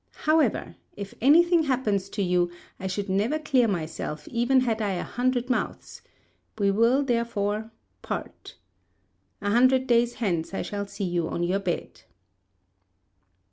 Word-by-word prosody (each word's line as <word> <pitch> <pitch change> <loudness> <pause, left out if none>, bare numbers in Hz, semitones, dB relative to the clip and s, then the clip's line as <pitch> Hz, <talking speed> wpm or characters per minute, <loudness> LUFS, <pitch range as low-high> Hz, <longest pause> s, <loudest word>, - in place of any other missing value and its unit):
However, 310 -6 +1 0.2
if 200 -1 -7
any 295 +7 +7
thing 345 -1 +3
happens 215 -8 0
to 200 - -2
you, 180 -1 +2 0.3
I 190 - -4
should 195 +2 -3
never 205 +10 +1
clear 265 -6 +2
myself 155 -5 -4
even 245 +3 +2
had 225 -3 0
I 205 -2 0
a 180 - -2
hundred 250 0 -1
mouths; 255 - -3 0.6
we 200 -2 +2
will, 230 +7 +3
therefore, 225 -4 -1 0.3
part. - - -6 0.9
A 205 - 0
hundred 255 +3 +4
days 240 -1 +2
hence 185 -5 -2
I - - -2
shall 200 -1 -4
see 200 - -6
you 175 -2 -1
on 170 - -2
your 185 +3 +1
bed." 180 -3 -4
220 Hz, 145 wpm, -26 LUFS, 195-255 Hz, 0.9 s, any